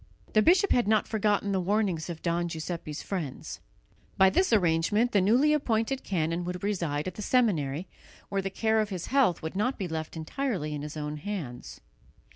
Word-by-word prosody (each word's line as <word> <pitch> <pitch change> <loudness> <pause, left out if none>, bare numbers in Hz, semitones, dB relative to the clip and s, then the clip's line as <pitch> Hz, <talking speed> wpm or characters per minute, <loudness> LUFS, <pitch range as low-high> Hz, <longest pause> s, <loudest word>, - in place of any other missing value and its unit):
The 215 - +5
bishop 370 - +4
had 240 -4 +3
not 215 -1 +3
forgotten 205 -2 +1
the 190 - +1
warnings 190 -4 0
of 165 -2 -7
Don 170 0 0
Giuseppe's 160 -2 -5
friends. 165 -9 -5 0.6
By 190 0 +6
this 370 - +2
arrangement 205 +4 +2
the 200 - +3
newly 250 +10 +4
appointed 255 -2 0
canon 170 -2 -1
would 180 +1 -5
reside 170 -7 -1
at 185 - -4
the 210 - -7
seminary, 185 - +1 0.4
where 195 -1 -1
the 195 - -3
care 220 +2 +1
of 215 - -2
his 185 -4 -4
health 255 - +3
would 160 +3 -4
not 250 +7 0
be 190 - -3
left 160 0 -5
entirely 160 - -2
in 145 - -4
his 150 +1 -6
own 150 0 -4
hands. 150 -9 -6
190 Hz, 185 wpm, -28 LUFS, 160-220 Hz, 0.6 s, By